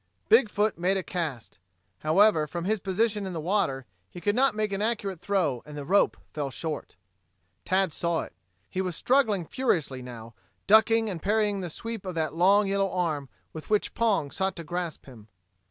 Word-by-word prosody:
Big 275 - +6
foot 210 -3 0
made 185 +3 +2
a 190 - -2
cast. 155 -12 -4 0.4
However, 160 0 +4
from 170 +3 -5
his 215 +2 +1
position 205 +2 0
in 185 - -5
the 165 - -3
water, 155 -7 0 0.2
he 175 - -9
could 205 +4 +1
not 270 -1 +3
make 215 -1 -1
an 195 - -2
accurate 205 -5 -2
throw 180 -10 0
and 150 -1 -10
the 145 - -5
rope 200 +6 +3 0.2
fell 145 -2 -2
short. 155 - -5 0.7
Tad 190 -2 +1
saw 170 0 0
it. - - -9 0.3
He 185 - -2
was 180 -3 -3
struggling 220 - +2
furiously 160 - -1
now, 115 -2 -9 0.3
ducking 220 +2 +5
and 180 -6 -4
parrying 210 0 +1
the 180 -2 -4
sweep 230 +5 -6
of 185 -3 -5
that 155 -3 -1
long, 195 +5 +4
yellow 195 0 +1
arm, 155 -7 -1 0.2
with 155 - -9
which 210 -1 +1
Pong 200 -11 +1
sought 190 0 -1
to 170 - -7
grasp 175 0 -4
him. 115 -6 -14
185 Hz, 185 wpm, -27 LUFS, 155-210 Hz, 0.7 s, Big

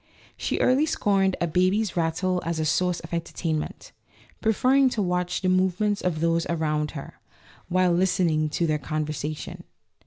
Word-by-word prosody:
She - - -2
early 270 +5 +3
scorned 195 -9 +1
a - - +1
baby's 185 +5 +1
rattle 180 +2 0
as 165 0 -2
a 155 - -1
source 180 +3 +1
of 165 - -10
entertainment, 165 -2 -3 0.5
preferring 255 +5 +3
to 235 - -4
watch 180 0 -1
the 185 - 0
movements 190 +3 +1
of 165 -4 -1
those 165 0 +1
around 155 -2 -1
her, 135 - -9 0.5
while 185 0 +3
listening 170 -4 +2
to 170 +3 0
their 155 -2 0
con 155 +2 -2
versation. 150 0 -5
175 Hz, 155 wpm, -25 LUFS, 160-190 Hz, 0.5 s, early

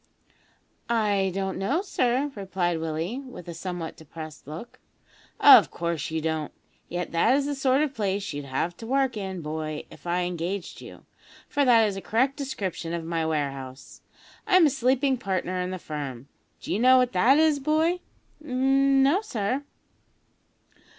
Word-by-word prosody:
"I 205 -4 +1
don't 190 -1 -2
know, 275 - 0
sir," 260 -5 0
replied 190 -5 -2
Willie, 165 +9 -3
with 255 -10 -10
a 170 - -5
somewhat 175 -2 -5
depressed 155 -2 -10
look. 160 +11 -9 0.6
"Of - - +9
course 170 -3 -3
you 160 0 -2
don't, 160 -1 -2 0.4
yet 175 0 -4
that 195 +10 +3
is 280 0 +1
the 290 - -1
sort 270 +1 +2
of 290 -3 -2
place 200 - -2
you'd 145 0 -5
have 140 +6 -2
to 225 - -9
work 265 -1 +1
in, 190 -3 -4
boy, 155 0 -4
if - - -13
I 175 +1 +1
engaged 175 +2 -4
you, - - -12 0.4
for 285 - +1
that 230 -3 +6
is 200 -2 -3
a - - -5
correct 260 +7 +1
description 195 - -4
of 170 - -4
my 165 -1 -1
warehouse. 140 -4 -4 0.5
I'm 370 -3 +6
a 295 - +3
sleeping 260 0 +1
partner 185 -2 -2
in 180 - -2
the 185 - -4
firm. 140 -6 -6 0.3
D'ye 200 - -2
know 255 +2 +6
what 250 -1 +3
that 240 +10 +5
is, 310 -2 +3
boy?" 315 +5 +1 0.4
"No, 270 +4 +3
sir." 250 - -2
195 Hz, 160 wpm, -26 LUFS, 165-265 Hz, 0.6 s, Of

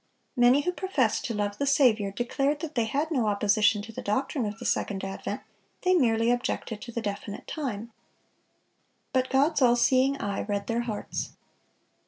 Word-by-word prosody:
(609) 245 -2 +5
Many 280 +3 +4
who 360 - +2
professed 355 - 0
to 230 - -2
love 205 0 -2
the 280 - 0
Saviour, 240 -8 +4
declared 260 +7 -1
that 320 -2 -5
they 235 -5 +1
had 290 +8 -1
no 250 -8 +1
opposition 210 +1 +3
to 225 - -9
the - - -7
doctrine 250 +3 -1
of 210 +1 -5
the - - -9
second 195 -2 -1
advent; 195 0 -4 0.4
they 365 0 +4
merely 230 -7 +3
objected 245 -3 -2
to 245 - -8
the 235 0 -4
definite 205 0 -5
time. 235 -7 -4 1.2
But 260 -1 +1
God's 285 +3 +2
all 240 -2 +6
seeing 260 +3 +3
eye 200 -1 -2
read 200 -1 -2
their 230 0 0
hearts. 220 -3 -4
235 Hz, 180 wpm, -27 LUFS, 210-275 Hz, 1.2 s, all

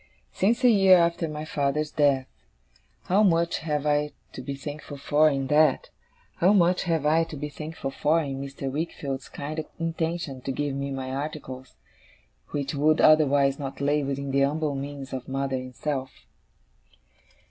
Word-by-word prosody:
'Since 230 +6 +1
a 250 - +7
year 195 -3 +7
after 170 -1 +1
my 150 0 -5
father's 150 0 -1
death. 140 -3 +2 0.8
How 195 +4 +2
much 170 -4 +2
have 150 -2 -2
I 150 0 +1 0.2
to - - -7
be 140 +2 -5
thankful 145 +1 -7
for, 150 +2 +3
in 135 -2 -1
that! 150 +3 +3 0.5
How 185 +4 +4
much 180 -2 +3
have 165 -4 0
I 160 +2 +4
to 165 -2 -8
be 150 +1 -4
thankful 155 -1 -6
for, 150 +4 +2
in 135 -4 -3
Mr. 140 -1 -5
Wickfield's 140 -3 -4
kind 155 +2 -5 0.2
intention 165 -4 -3
to 135 - -3
give 145 +1 -2
me 140 +1 -3
my 135 -1 -4
articles, 135 -2 -6 0.7
which 140 0 -3
would 150 +2 +3
otherwise 145 -3 +4
not 135 -2 -6
lay 145 +2 +1
within 140 0 -3
the 140 +1 +3
umble 150 +1 0
means 140 0 -6
of 130 -1 -5
mother 135 0 -1
and 130 -1 -8
self! 135 -3 -3
145 Hz, 165 wpm, -26 LUFS, 135-160 Hz, 0.8 s, a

